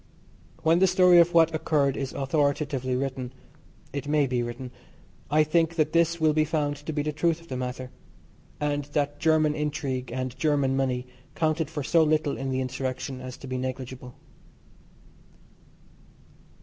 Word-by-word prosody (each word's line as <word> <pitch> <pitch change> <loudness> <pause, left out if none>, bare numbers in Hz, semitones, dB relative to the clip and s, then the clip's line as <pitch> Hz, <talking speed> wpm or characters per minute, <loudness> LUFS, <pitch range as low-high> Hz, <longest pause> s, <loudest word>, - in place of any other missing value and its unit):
When 165 +2 +4
the 190 - +5
story 180 -1 +6
of 170 0 +4
what 165 -1 +5
occurred 145 -3 +1
is 135 -1 -3
authoritatively 140 -2 0
written 130 -1 -3 0.6
(it 140 0 -4
may 150 -1 +3
be 125 -2 -1
written) 120 +1 -5 0.6
I 155 +2 +4
think 165 +1 +1
that 155 -2 +1
this 170 0 +2
will 155 -1 +3
be 155 0 +3
found 150 -2 -1
to 145 +3 -6
be 150 -1 -1
the 150 - -1
truth 165 +2 0
of 170 - -18
the 130 - -4
matter, 125 0 -5 0.7
and 145 -1 -1
that 145 0 0
German 155 -1 +3
intrigue 140 -4 -3
and 130 0 -3
German 140 -2 +2
money 130 -2 0 0.3
counted 155 -1 0
for 150 -3 -4
so 165 +4 +3
little 155 -2 +2
in 135 0 -4
the 130 0 -1
insurrection 130 0 -4
as 130 -1 -7
to - - -11
be 130 -1 -3
negligible. 130 -1 -6
145 Hz, 160 wpm, -26 LUFS, 130-155 Hz, 0.7 s, story